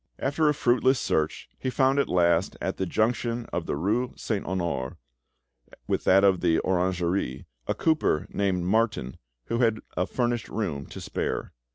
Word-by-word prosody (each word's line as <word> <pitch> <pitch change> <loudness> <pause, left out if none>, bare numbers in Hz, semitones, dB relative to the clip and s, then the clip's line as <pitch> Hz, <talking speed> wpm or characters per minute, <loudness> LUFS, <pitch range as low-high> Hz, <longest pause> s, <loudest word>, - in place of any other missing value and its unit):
After 150 +3 +1
a - - +3
fruitless 130 0 +3
search, 80 0 -1
he 130 - -2
found 135 +2 +2
at 140 - +1
last, 85 0 +2
at 95 - -3
the 95 - -1
junction 115 +3 0
of 85 -1 -2
the - - -1
rue 110 - 0
Saint 105 -4 -3
Honore 85 -8 -2 0.9
with - - -1
that 95 +1 +6
of 95 -2 +4
the 85 -2 +3
Orangerie, 90 -6 0 0.2
a - - 0
cooper 155 - +1
named 95 -3 0
Martin, 100 - 0 0.3
who 115 - -1
had 115 -3 +3 0.2
a 90 - 0
furnished 120 -2 -1
room 80 -11 -3
to - - -9
spare. - - -3
100 Hz, 165 wpm, -26 LUFS, 85-120 Hz, 0.9 s, that